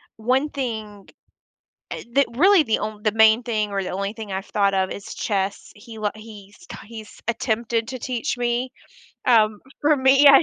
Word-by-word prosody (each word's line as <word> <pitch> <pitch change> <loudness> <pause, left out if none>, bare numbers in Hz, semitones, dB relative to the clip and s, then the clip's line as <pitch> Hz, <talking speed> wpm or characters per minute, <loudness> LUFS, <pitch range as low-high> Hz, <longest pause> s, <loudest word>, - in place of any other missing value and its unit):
one 255 +6 +1
thing, 220 -7 -5 0.8
eh, - - -5
that 280 - +5
really 370 +2 +5
the 225 - 0
onl 210 0 -5
the 215 - +2
main 220 +2 +5
thing 215 -3 -1
or 195 -1 -1
the - - -5
only 200 +2 -3
thing 220 -3 -8
I've 190 +1 -4
thought 200 -1 +1
of 190 0 +1
is 200 +2 -7
chess. 200 -2 -2
He 220 +1 -12
li 210 -1 0
he's 210 -2 -13
ki - - -8
he's 220 -2 -11
attempted 230 0 -1
to 255 -1 -6
teach 245 -1 -2
me 245 +1 -1 0.6
um, 215 -3 +4 0.2
for 295 0 +3
me, 270 +2 +5
I 275 +3 +8
220 Hz, 185 wpm, -22 LUFS, 210-250 Hz, 0.8 s, I